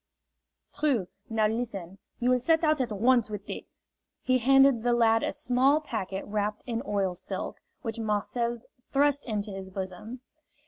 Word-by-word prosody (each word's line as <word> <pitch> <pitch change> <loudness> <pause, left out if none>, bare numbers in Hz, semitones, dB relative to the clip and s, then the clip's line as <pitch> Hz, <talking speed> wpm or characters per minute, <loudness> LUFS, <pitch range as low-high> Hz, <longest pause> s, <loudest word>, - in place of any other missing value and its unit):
"True. 275 -11 +1 0.2
Now 220 -1 +2
listen. 200 -5 -4 0.2
You 245 +1 +2
will 250 - +4
set 320 +6 +2
out 310 -3 +3
at 245 - -1
once 235 +2 +3
with 210 -2 -6
this." - - -8 0.4
He 255 0 +3
handed 270 0 +5
the 240 +1 +2
lad 225 -1 +4
a - - 0
small 265 +4 +3
packet 200 -9 -4
wrapped 210 0 -2
in 235 -2 -2
oil 195 -3 0
silk, 175 - -5 0.2
which 230 -1 -4
Marcel 230 +2 -1 0.3
thrust 285 0 +2
into 210 -2 -2
his 195 -1 -7
bosom. 190 +6 -6
230 Hz, 155 wpm, -28 LUFS, 205-255 Hz, 0.4 s, handed